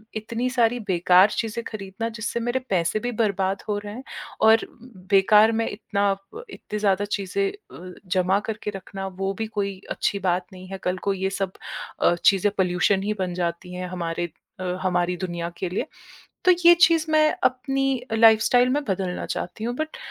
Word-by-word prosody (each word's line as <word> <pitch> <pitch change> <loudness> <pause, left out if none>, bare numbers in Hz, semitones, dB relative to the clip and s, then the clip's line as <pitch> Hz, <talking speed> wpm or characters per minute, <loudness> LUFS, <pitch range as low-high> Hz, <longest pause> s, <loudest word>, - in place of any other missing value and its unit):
इतनी 230 +3 -2
सारी 245 -1 +2
बेकार 180 +2 +5
चीज़ें 230 +1 -2
खरीदना, 205 +1 -5
जिससे 225 +1 -4
मेरे 240 +2 -1
पैसे 180 +2 +1
भी 245 +2 -3
बर्बाद 195 -4 0
हो 205 -1 0
रहे 205 0 -8
हैं 255 +3 -8 0.4
और 220 +1 +6
उम, - - -22 0.3
बेकार 210 +3 +6
में 225 0 0
इतना 205 -1 -3
आप 195 - -5
इतनी 210 - -6
ज़्यादा 200 -1 +2
चीज़ें 205 - -1
अ, 185 - -12
जमा 185 +2 +2
करके 215 -1 -4
रखना, 195 0 -6
वो 195 +1 -3
भी 220 - -1
कोई 200 -3 -3
अच्छी 200 - -1
बात 180 -1 0
नहीं 185 0 -11
है। 195 - -5
कल 180 +1 -1
को 200 - +3
ये 190 0 -1
सब 195 -1 -3 0.5
अ, - - +5
चीज़ें 200 +1 +4
पॉल्यूशन 190 +1 +2
ही 210 +1 0
बन 180 -1 -1
जाती 175 0 -3
हैं 180 0 -4
हमारे 175 -1 -3 0.3
अ, - - -4 0.2
हमारी 180 -1 0
दुनिया 175 -2 -4
के 185 - -3
लिए। 200 +8 -2 0.6
तो 365 - +8
ये 345 0 +10
चीज़ 330 -2 +2
मैं 310 0 +4
अपनी 270 +1 +1
अ, - - +1
लाइफ़स्टाइल 230 +3 +5
में 290 +2 0
बदलना 190 -3 -2
चाहती 180 +5 -5
हूँ, 240 +1 -2
बट 310 +2 -4
200 Hz, 185 wpm, -24 LUFS, 185-230 Hz, 0.6 s, ये